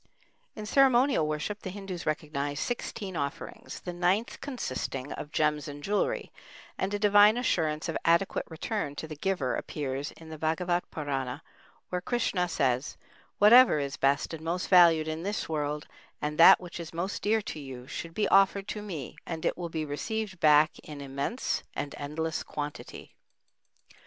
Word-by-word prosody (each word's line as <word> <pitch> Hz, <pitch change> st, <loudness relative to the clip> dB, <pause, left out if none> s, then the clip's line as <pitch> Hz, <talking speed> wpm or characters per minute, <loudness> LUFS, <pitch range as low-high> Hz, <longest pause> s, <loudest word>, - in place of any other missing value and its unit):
In 215 Hz, -, -6 dB
ceremonial 260 Hz, -, +4 dB
worship 155 Hz, +7 st, -3 dB
the 190 Hz, -, -5 dB
Hindus 190 Hz, -2 st, -6 dB
recognize 145 Hz, -2 st, -2 dB
sixteen 205 Hz, -5 st, -4 dB
offerings, 140 Hz, -2 st, -5 dB
the 180 Hz, -, -5 dB
ninth 180 Hz, +6 st, 0 dB
consisting 140 Hz, -, -4 dB
of 150 Hz, -, -7 dB
gems 150 Hz, -2 st, +1 dB
and 145 Hz, 0 st, -8 dB
jewelry, 205 Hz, +4 st, -1 dB, 0.4 s
and 190 Hz, -, -2 dB
a 205 Hz, -, 0 dB
divine 205 Hz, +1 st, +6 dB
assurance 160 Hz, -11 st, 0 dB
of 165 Hz, -, -3 dB
adequate 170 Hz, +3 st, +2 dB
return 160 Hz, -2 st, -3 dB
to 160 Hz, -, -6 dB
the 155 Hz, -, -7 dB
giver 150 Hz, -6 st, -1 dB
appears 140 Hz, -1 st, -4 dB
in 160 Hz, -1 st, -13 dB
the 155 Hz, -1 st, -8 dB
Bhagavat 175 Hz, +3 st, 0 dB
Purana, 140 Hz, -2 st, -3 dB, 0.5 s
where 180 Hz, 0 st, -2 dB
Krishna 190 Hz, -5 st, 0 dB
says, 130 Hz, -3 st, 0 dB, 0.4 s
"Whatever 235 Hz, -1 st, +7 dB
is 140 Hz, -2 st, -2 dB
best 140 Hz, +3 st, +1 dB
and 160 Hz, -1 st, -7 dB
most 175 Hz, +3 st, -2 dB
valued 170 Hz, -4 st, +6 dB
in 160 Hz, +1 st, -3 dB
this 205 Hz, +4 st, -3 dB
world 150 Hz, -1 st, -2 dB, 0.3 s
and 150 Hz, +1 st, -3 dB
that 165 Hz, -, +9 dB
which 175 Hz, -1 st, -8 dB
is 165 Hz, -1 st, -8 dB
most 185 Hz, +4 st, -3 dB
dear 215 Hz, +1 st, +2 dB
to 155 Hz, -, -6 dB
you 130 Hz, -3 st, -8 dB
should 165 Hz, +5 st, -7 dB
be 210 Hz, -, +1 dB
offered 195 Hz, 0 st, +4 dB
to 210 Hz, -, -4 dB
me, 170 Hz, -11 st, -6 dB
and 165 Hz, -2 st, -4 dB
it -, -, +1 dB
will 175 Hz, -1 st, -5 dB
be 160 Hz, -1 st, -3 dB
received 190 Hz, +6 st, -4 dB
back 150 Hz, -1 st, +5 dB
in 150 Hz, -2 st, -9 dB
immense 140 Hz, -, -2 dB
and 145 Hz, -, -4 dB
endless 155 Hz, +3 st, -3 dB
quantity." 145 Hz, 0 st, -7 dB
165 Hz, 165 wpm, -29 LUFS, 150-195 Hz, 0.5 s, that